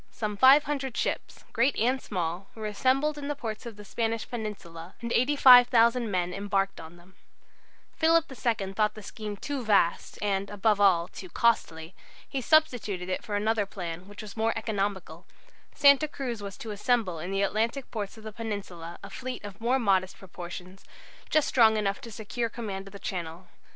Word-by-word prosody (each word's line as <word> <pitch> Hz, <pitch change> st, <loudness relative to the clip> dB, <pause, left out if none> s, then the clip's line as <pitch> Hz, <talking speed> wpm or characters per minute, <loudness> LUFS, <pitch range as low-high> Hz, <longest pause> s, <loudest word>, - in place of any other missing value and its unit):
Some 210 Hz, -2 st, -4 dB
500 270 Hz, +1 st, +4 dB
ships, -, -, -3 dB
great 245 Hz, +4 st, +2 dB
and 255 Hz, +4 st, +1 dB
small, 180 Hz, 0 st, -3 dB
were 220 Hz, -, -8 dB
to -, -, -1 dB
be -, -, -6 dB
assembled 270 Hz, +7 st, +1 dB
in 280 Hz, -, -5 dB
the 290 Hz, -, -2 dB
ports 230 Hz, -3 st, -6 dB
of 230 Hz, -, -8 dB
the 210 Hz, 0 st, -12 dB
Spanish 225 Hz, +1 st, -2 dB
peninsula, 190 Hz, -7 st, -7 dB
and 235 Hz, -1 st, -5 dB
85,000 245 Hz, -3 st, +6 dB
men 180 Hz, -2 st, -1 dB
embarked 195 Hz, 0 st, -1 dB
on 160 Hz, +1 st, -11 dB
them. 175 Hz, +2 st, -19 dB, 0.8 s
Philip 330 Hz, 0 st, +4 dB
II 220 Hz, -6 st, -2 dB
thought 210 Hz, +1 st, +1 dB
the 215 Hz, -, -10 dB
scheme 210 Hz, 0 st, -6 dB
too 280 Hz, +3 st, -4 dB
vast, 200 Hz, -6 st, +2 dB
and, 200 Hz, -1 st, -1 dB
above 205 Hz, 0 st, +1 dB
all, 175 Hz, -4 st, +4 dB
too 185 Hz, 0 st, -10 dB
costly. 165 Hz, -8 st, 0 dB, 0.3 s
He 270 Hz, -, -3 dB
substituted 225 Hz, -, +1 dB
for 215 Hz, -3 st, -4 dB
it 205 Hz, -, 0 dB
another 220 Hz, -2 st, +1 dB
plan, 180 Hz, -2 st, -6 dB
which 205 Hz, +2 st, -10 dB
was 205 Hz, -2 st, -10 dB
more 225 Hz, 0 st, +1 dB
economical. 200 Hz, -6 st, -3 dB, 0.5 s
Santa 280 Hz, +1 st, +6 dB
Cruz 250 Hz, -7 st, -5 dB
was 200 Hz, -1 st, -7 dB
to 220 Hz, -, -7 dB
assemble 210 Hz, -5 st, 0 dB
in 175 Hz, -, -5 dB
the 195 Hz, +1 st, 0 dB
Atlantic 230 Hz, +6 st, -1 dB
ports 210 Hz, -1 st, -5 dB
of 220 Hz, -, -13 dB
the 215 Hz, -, -6 dB
Peninsula 195 Hz, -6 st, -6 dB
a -, -, -9 dB
fleet 255 Hz, -2 st, -6 dB
of 205 Hz, +1 st, -9 dB
more 245 Hz, +3 st, +2 dB
modest 190 Hz, -6 st, +1 dB
proportions, 180 Hz, 0 st, -9 dB, 0.5 s
just 310 Hz, -2 st, +3 dB
strong 220 Hz, -3 st, +5 dB
enough 200 Hz, -2 st, -1 dB
to 235 Hz, -, -9 dB
secure 230 Hz, +2 st, -3 dB
command 200 Hz, -4 st, -6 dB
of -, -, -11 dB
the -, -, -7 dB
Channel. 175 Hz, -2 st, -5 dB
210 Hz, 180 wpm, -28 LUFS, 195-240 Hz, 0.8 s, 85,000